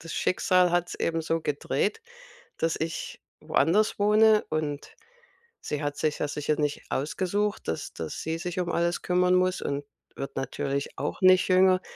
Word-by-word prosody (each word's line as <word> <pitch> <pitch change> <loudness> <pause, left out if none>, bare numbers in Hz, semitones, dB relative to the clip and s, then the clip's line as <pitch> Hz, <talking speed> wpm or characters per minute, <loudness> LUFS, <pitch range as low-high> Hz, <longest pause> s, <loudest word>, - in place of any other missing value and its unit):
das 165 - -8
Schicksal 185 -2 +2
hat's 175 0 0
eben 165 0 -1
so 165 +1 -1
gedreht, 155 - -1 0.6
dass 165 0 0
ich 160 0 -4 0.2
woanders 190 +9 +2
wohne. 215 +1 +5
Und 150 -2 -3 0.7
sie 150 - -3
hat 145 0 -2
sich 155 -1 -1
ja - - 0
sicher 150 +1 -1
nicht 145 -1 -1
ausgesucht, 190 +8 -1
dass 80 - -4
dass 80 - -5
sie 160 0 -2
sich 180 +1 -4
um 180 -1 -1
alles 170 +1 0
kümmern 180 0 +2
muss 185 0 +1
und 140 0 -3 0.3
wird 135 0 -6
natürlich 135 +1 -3
auch - - -4
nicht 185 0 +6
jünger. 185 0 +4
165 Hz, 160 wpm, -27 LUFS, 150-185 Hz, 0.7 s, nicht